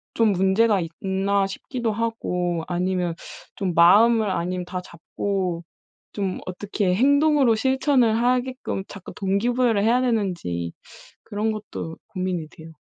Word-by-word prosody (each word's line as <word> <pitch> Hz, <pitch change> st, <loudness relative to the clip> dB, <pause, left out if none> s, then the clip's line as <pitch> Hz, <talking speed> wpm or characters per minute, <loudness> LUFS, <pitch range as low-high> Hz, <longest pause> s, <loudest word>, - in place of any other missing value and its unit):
좀 225 Hz, -2 st, +3 dB
문제가 195 Hz, +3 st, +3 dB, 0.2 s
있나?' 195 Hz, +1 st, +1 dB
싶기도 235 Hz, +4 st, -3 dB
하고 180 Hz, -7 st, -2 dB
아니면 180 Hz, -1 st, -1 dB, 0.4 s
좀 190 Hz, -3 st, -2 dB
마음을 215 Hz, +6 st, +6 dB
아님 180 Hz, +1 st, -2 dB
다잡고 180 Hz, 0 st, -4 dB, 0.5 s
좀 195 Hz, -3 st, -2 dB
어떻게 185 Hz, 0 st, -2 dB
행동으로 285 Hz, 0 st, +4 dB
실천을 260 Hz, -2 st, +2 dB
하게끔 250 Hz, -3 st, -1 dB
자꾸 195 Hz, -3 st, -10 dB
동기부여를 220 Hz, +3 st, +1 dB
해야 240 Hz, +3 st, +3 dB
되는지 180 Hz, -, -1 dB, 0.5 s
그런 210 Hz, +2 st, -2 dB
것도 210 Hz, -6 st, -6 dB
고민이 180 Hz, -3 st, -3 dB
돼요. 160 Hz, +1 st, -13 dB
200 Hz, 270 characters per minute, -23 LUFS, 180-230 Hz, 0.5 s, 마음을